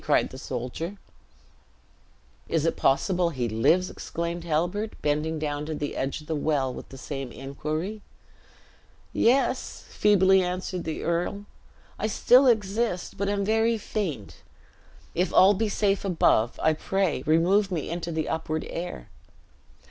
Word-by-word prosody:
cried -, -, +2 dB
the 130 Hz, -, -9 dB
soldier. 130 Hz, +10 st, -5 dB, 1.5 s
"Is 165 Hz, -2 st, +1 dB
it 165 Hz, -, +1 dB
possible 175 Hz, +5 st, +2 dB
he 130 Hz, -7 st, -2 dB
lives!" 140 Hz, +12 st, +2 dB
exclaimed 170 Hz, 0 st, -4 dB
Halbert, 175 Hz, +7 st, -1 dB
bending 150 Hz, +2 st, 0 dB
down 145 Hz, -1 st, -2 dB
to 155 Hz, -, -3 dB
the 145 Hz, -1 st, -4 dB
edge 135 Hz, +3 st, -2 dB
of -, -, -14 dB
the 160 Hz, -, -2 dB
well 145 Hz, -4 st, 0 dB
with -, -, -9 dB
the 135 Hz, -, -10 dB
same 135 Hz, -2 st, -6 dB
inquiry. 155 Hz, -, -4 dB, 1.1 s
"Yes," 255 Hz, +1 st, +1 dB
feebly 190 Hz, -2 st, +4 dB
answered 180 Hz, 0 st, -3 dB
the 160 Hz, -1 st, -4 dB
earl, 175 Hz, +4 st, -1 dB, 0.5 s
"I 215 Hz, -, 0 dB
still 250 Hz, +5 st, +5 dB
exist, 215 Hz, -4 st, 0 dB
but 200 Hz, +1 st, -1 dB
am 200 Hz, -1 st, 0 dB
very 225 Hz, +2 st, +2 dB
faint. 175 Hz, -, -4 dB, 0.8 s
If 180 Hz, +2 st, 0 dB
all 195 Hz, +2 st, +7 dB
be 215 Hz, +2 st, 0 dB
safe 200 Hz, -1 st, +1 dB
above, 160 Hz, -, +2 dB
I 160 Hz, -, +4 dB
pray 190 Hz, -2 st, -1 dB
remove 185 Hz, +6 st, +3 dB
me 165 Hz, -3 st, -3 dB
into 170 Hz, 0 st, -3 dB
the 160 Hz, -1 st, -2 dB
upward 160 Hz, -1 st, -2 dB
air!" 170 Hz, -, -5 dB
170 Hz, 140 wpm, -26 LUFS, 150-200 Hz, 1.5 s, all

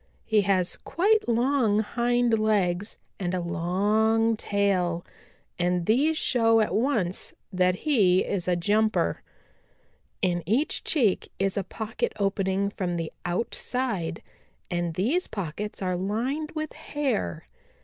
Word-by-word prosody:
He 215 Hz, -2 st, +3 dB
has 190 Hz, -2 st, +1 dB
quite 420 Hz, -, +1 dB
long 235 Hz, -3 st, +2 dB
hind 240 Hz, 0 st, +1 dB
legs 205 Hz, -2 st, 0 dB, 0.2 s
and 185 Hz, -1 st, -1 dB
a -, -, 0 dB
long 210 Hz, +7 st, +1 dB
tail, 190 Hz, -5 st, 0 dB, 0.5 s
and 175 Hz, 0 st, +1 dB
these 290 Hz, -, +3 dB
show 225 Hz, -5 st, +4 dB
at 215 Hz, -, +1 dB
once 215 Hz, -7 st, 0 dB, 0.2 s
that 180 Hz, 0 st, +3 dB
he 195 Hz, -11 st, +4 dB
is 185 Hz, -3 st, -2 dB
a 180 Hz, -, +3 dB
jumper. 215 Hz, +5 st, +1 dB, 1.0 s
In 175 Hz, -2 st, +1 dB
each 250 Hz, -, +1 dB
cheek 235 Hz, -, +1 dB
is 195 Hz, 0 st, 0 dB
a 200 Hz, -, 0 dB
pocket 220 Hz, +4 st, -3 dB
opening 195 Hz, 0 st, 0 dB
from 180 Hz, -4 st, -2 dB
the 165 Hz, -1 st, -3 dB
outside, 185 Hz, -1 st, -2 dB, 0.5 s
and 175 Hz, -2 st, -1 dB
these 270 Hz, -, +1 dB
pockets 200 Hz, +2 st, -5 dB
are 185 Hz, -1 st, 0 dB
lined 250 Hz, -, -2 dB
with 310 Hz, -1 st, -4 dB
hair. 260 Hz, -, -2 dB
205 Hz, 125 wpm, -26 LUFS, 180-235 Hz, 1.0 s, show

